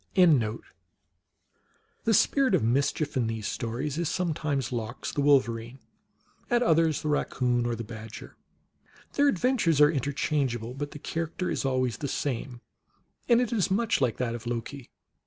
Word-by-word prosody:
The 140 - +4 1.5
Spirit 265 -3 +3
of 170 - +1
Mischief 140 +5 0
in 125 -3 +1
these 110 -2 -4
stories 130 +7 -3
is 170 -2 0
sometimes 155 -7 -1
Lox, 120 0 -4
the 145 - -1
Wolverine; 130 -4 +2 0.7
at 240 -1 +3
others 165 -6 +2
the - - -2
Raccoon, 125 -5 0
or 120 - -1
the 115 - -5
Badger. 110 0 -9 0.8
Their 285 0 +3
adventures 220 - +2
are 150 0 +7
interchangeable. 135 -4 -1
But 145 +2 -4
the - - -9
character 165 +4 -3
is - - -2
always 130 -4 0
the 145 - -3
same, 125 -2 -3 0.7
and 235 -1 +6
it 245 -2 0
is 205 -5 +1
much 205 -3 +1
like 125 -4 +1
that 120 -2 -1
of 120 0 -7
Loki. 120 +2 -5
140 Hz, 150 wpm, -27 LUFS, 120-165 Hz, 1.5 s, are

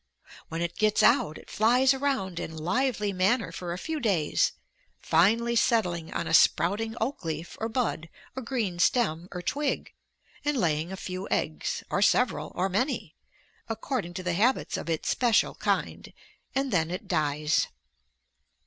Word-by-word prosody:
When 165 +1 -2
it 170 0 -4
gets 215 -1 +3
out 155 - +4
it - - -14
flies 250 +5 +4
around 265 -11 -1
in 160 - -6
lively 210 +4 0
manner 200 +6 +1
for 175 -1 -5
a 175 - -3
few 320 +9 -3
days, 190 - +1 0.5
finally 225 +8 +3
settling 180 -8 +1
on - - -2
a - - -3
sprouting 220 +6 +3
oak 235 0 -2
leaf 160 +1 -4
or 225 - -1
bud 220 -9 -2 0.3
or 260 - -4
green 225 -8 -2
stem 180 -5 +1
or 180 -1 -6
twig, 290 +8 -2 0.5
and 295 -1 0
laying 165 -4 0
a 190 - -5
few 185 +1 -5
eggs, 155 - -2
or 200 - +1
several, 245 +4 +2
or 185 +2 +1
many, 250 +9 -1 0.5
according 225 -5 -3
to 185 - -4
the 180 -1 -1
habits 235 +9 +1
of - - -5
its 160 -1 -2
special 240 -3 +2
kind, - - -2 0.4
and 270 -1 0
then 165 -3 +2
it 180 - -5
dies. 150 -2 +1
195 Hz, 155 wpm, -27 LUFS, 170-240 Hz, 0.5 s, out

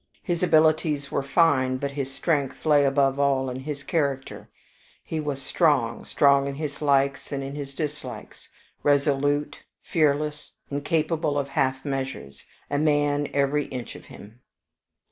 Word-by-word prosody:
His 175 -2 -2
abilities 155 -4 +2
were - - 0
fine, 135 -3 +2
but 140 +1 -3
his 140 -1 -4
strength 140 -1 -1
lay 145 -2 +5
above 135 0 +2
all 135 -2 +1
in 125 - -5
his 140 +1 -6
character: 140 -3 -2 0.5
he 160 - -4
was 145 -3 -3
strong, 135 -5 +1
strong 140 -1 +3
in 140 - -4
his 150 0 -5
likes 140 -1 +1
and 140 -1 -3
in 135 +1 -6
his 140 -1 -7
dislikes, 145 -7 -6 0.3
resolute, 145 0 +1 0.2
fearless, 150 -1 0 0.2
incapable 150 +1 0
of 140 -1 -1
half 135 -1 0
measures 130 - -5 0.2
a 145 - -1
man, 145 -1 +2
every 140 +1 +1
inch 125 -3 -7
of - - -12
him. 105 +4 -13
140 Hz, 145 wpm, -25 LUFS, 135-150 Hz, 0.5 s, lay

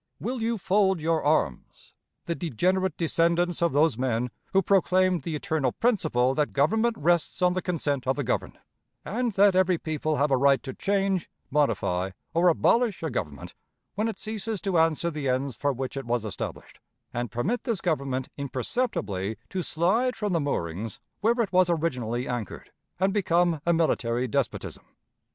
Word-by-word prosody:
Will 245 +2 -3
you 230 +1 0
fold 190 -1 +2
your 160 +1 0
arms, 145 - -1 0.3
the 170 - -1
degenerate 185 - 0
descendants 170 +1 +1
of 170 -1 +3
those 145 -3 +2
men 125 -1 0 0.2
who 195 0 +3
proclaimed 185 -1 +3
the 165 -2 -4
eternal 150 -4 -1
principle 155 - +1
that 150 +1 0
government 220 +12 +2
rests 170 +2 +1
on 180 0 +4
the 185 - -1
consent 145 -7 -2
of 130 - +2
the - - -2
governed; - - -2 0.5
and 235 +2 -1
that 195 0 +5
every 185 -1 +3
people 155 -1 -2
have 145 0 +1
a 135 - +4
right 135 -2 +3
to 130 - -5
change, 195 -2 0 0.2
modify, 100 -10 +1 0.2
or 170 +2 +3
abolish 215 +4 +2
a 160 - -2
government 75 - -5 0.4
when 215 +3 -1
it 220 -4 -4
ceases 215 0 -4
to 190 -5 +1
answer 165 +1 +2
the 150 -3 -2
ends 130 0 -1
for 145 +5 0
which 135 +1 -4
it 135 -2 -4
was 120 -2 0
established, 105 - -6 0.3
and 120 -1 -2
permit 180 - -1
this 230 -7 -2
Government 140 -7 -1
imperceptibly 125 - -2
to 190 - -1
slide 200 +11 +1
from 210 -3 -2
the 165 - +2
moorings 100 - -3 0.2
where 230 +3 +2
it 205 -6 -1
was 180 -1 +4
originally 125 -8 -1
anchored, 120 -6 -5 0.3
and 190 +1 +2
become 175 -5 +2
a - - +5
military 130 -7 +1
despotism? 110 - -2
165 Hz, 170 wpm, -26 LUFS, 130-190 Hz, 0.5 s, that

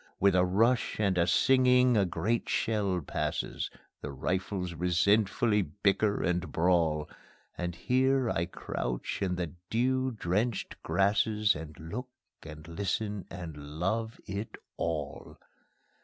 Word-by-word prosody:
With 100 0 +4
a 90 0 +4
rush 115 +8 +2
and 100 -3 +2
a 85 -1 +2
singing 125 +5 +5
a 100 -3 +4
great 90 +7 -1
shell 100 -5 0
passes; 70 - -2 0.3
The 70 - -5
rifles 90 +5 -2
resentfully 100 +5 +2
bicker 100 +4 +1
and 90 +1 0
brawl, 80 -3 +2 0.5
And 90 -1 -3
here 130 +5 +2
I 85 -5 0
crouch 60 -7 -4
in 90 -2 0
the 85 -3 -3 0.2
dew 130 +3 +1
drenched 105 0 -2
grasses, 105 +1 +2
And 75 0 -8
look 105 +11 -6 0.3
and 75 0 -10
listen 100 +3 -2
and 85 -4 -7 0.2
love 110 +5 -1
it 100 +3 -5 0.2
all. 80 -4 -4
95 Hz, 125 wpm, -30 LUFS, 85-110 Hz, 0.5 s, singing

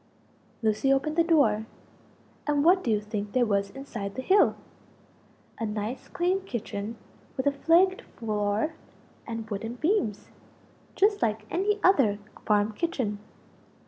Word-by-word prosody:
Lucie 220 +5 +2
opened 290 +3 +1
the 335 - +4
door: 235 -11 +3 0.8
and 290 0 +2
what 365 +2 +5
do - - -1
you 215 -2 +3
think 210 -1 -5
there 255 -1 +3
was 200 -2 0
inside 215 -5 -6
the 260 - -3
hill? 390 +6 +4 1.0
a 225 - -1
nice 210 +4 -4
clean 365 +2 0
kitchen 225 - -5 0.4
with 260 - -1
a 285 - +4
flagged 340 +7 +3 0.2
floor 210 +5 -1 0.5
and 225 -2 -5
wooden 225 +4 -4
beams 275 - -1 0.6
just 410 +1 +3
like 215 -1 0
any 410 +3 +1
other 270 - +4 0.3
farm 210 0 +3
kitchen. 220 -6 -2
235 Hz, 135 wpm, -27 LUFS, 210-330 Hz, 1.0 s, what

